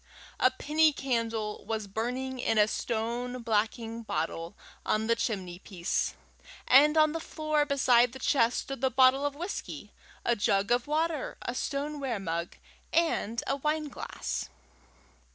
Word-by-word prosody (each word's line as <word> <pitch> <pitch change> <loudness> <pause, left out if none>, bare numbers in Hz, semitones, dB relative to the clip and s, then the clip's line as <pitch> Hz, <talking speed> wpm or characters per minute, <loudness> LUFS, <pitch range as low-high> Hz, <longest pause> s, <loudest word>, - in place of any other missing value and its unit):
A - - +6
penny 310 +1 +3
candle 230 -5 -2
was 220 -2 -3
burning 250 +6 -3
in 225 -2 +1
a 210 0 +6
stone 235 +3 -3
blacking 225 +1 -1
bottle 165 -2 -3 0.3
on 215 +1 +1
the 230 +1 +3
chimney 190 -7 -3
piece, 180 -3 -2 0.5
and 295 +4 +6
on 310 -1 +5
the 330 - -3
floor 310 -2 -1
beside 250 -4 +4
the 265 - -9
chest 245 -2 +2
stood 275 -3 -7
the 265 - +3
bottle 260 +1 +5
of 285 - -5
whisky, 350 +6 -6 0.3
a 240 - +3
jug 200 0 +1
of 245 +3 +2
water, 310 -1 -1
a 240 - -3
stoneware 280 -3 -2
mug, 170 -2 -3 0.4
and 320 -9 +1
a 275 - 0
wineglass. 300 +1 -3
245 Hz, 140 wpm, -29 LUFS, 220-285 Hz, 0.5 s, A